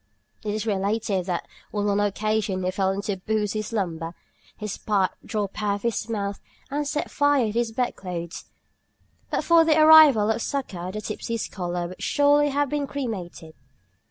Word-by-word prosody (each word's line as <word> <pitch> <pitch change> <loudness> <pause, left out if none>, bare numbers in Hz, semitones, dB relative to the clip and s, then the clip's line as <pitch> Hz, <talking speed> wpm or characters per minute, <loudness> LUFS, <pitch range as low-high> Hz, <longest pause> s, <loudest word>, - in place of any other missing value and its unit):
It 210 -1 -2
is 215 0 -3
related 200 -2 0
that 175 -2 -2 0.3
on 205 -1 -1
one 200 0 +2
occasion 205 -1 0
he 185 - 0
fell 190 0 0
into 200 +2 -2
a - - -5
boosy 215 +2 -1
slumber, 170 -6 -3 0.4
his 210 -2 -4
pipe 200 -3 +1
dropped 210 -2 -3
out 205 -1 +1
of 200 - -7
his 230 -1 -1
mouth 200 -3 -3 0.3
and 290 +1 -1
set 295 +1 -2
fire 285 -7 +2
to 235 +1 +2
the 225 - -7
bed 250 +1 -1
clothes. 170 -2 -6 0.8
But - - -1
for 335 -1 +6
the 315 -1 +3
arrival 310 -9 +8
of 225 - -2
succor 185 -11 -3
the 215 +2 -5
tipsy 225 +2 -4
scholar 175 -5 -3
would 185 - -11
surely 290 0 +3
have 285 +1 +1
been 290 0 -1
cremated. 195 - -5
210 Hz, 175 wpm, -25 LUFS, 190-245 Hz, 0.8 s, arrival